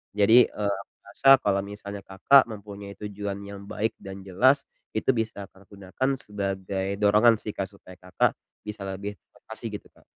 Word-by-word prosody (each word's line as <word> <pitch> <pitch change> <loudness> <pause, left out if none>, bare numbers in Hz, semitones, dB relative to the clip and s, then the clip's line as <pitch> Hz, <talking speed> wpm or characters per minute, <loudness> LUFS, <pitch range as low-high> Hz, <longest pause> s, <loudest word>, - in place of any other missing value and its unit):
Jadi, 110 +4 +6
eee, 100 -1 -2
aku - - -19
rasa 115 +7 +2
kalau 100 -4 0
misalnya 100 0 -8
Kakak 115 +8 +4
mempunyai 100 -1 -9
tujuan 100 -1 -5
yang 100 0 -9
baik 110 +1 -1
dan 95 -1 -9
jelas, 125 +10 +3 0.3
itu 110 - -1
bisa 110 -4 -3
Kakak 95 0 -22
gunakan 100 +7 -3
sebagai 95 -2 -3
dorongan 105 +2 +5
sih 105 -1 -4
Kak, 95 -1 -4
supaya 100 -2 -10
Kakak 90 0 +1 0.3
bisa 105 -1 -7
lebih 100 +2 -5 0.2
termotivasi 110 +1 -5
gitu, 105 - -8
Kak. - - -24
100 Hz, 165 wpm, -26 LUFS, 100-105 Hz, 0.3 s, Jadi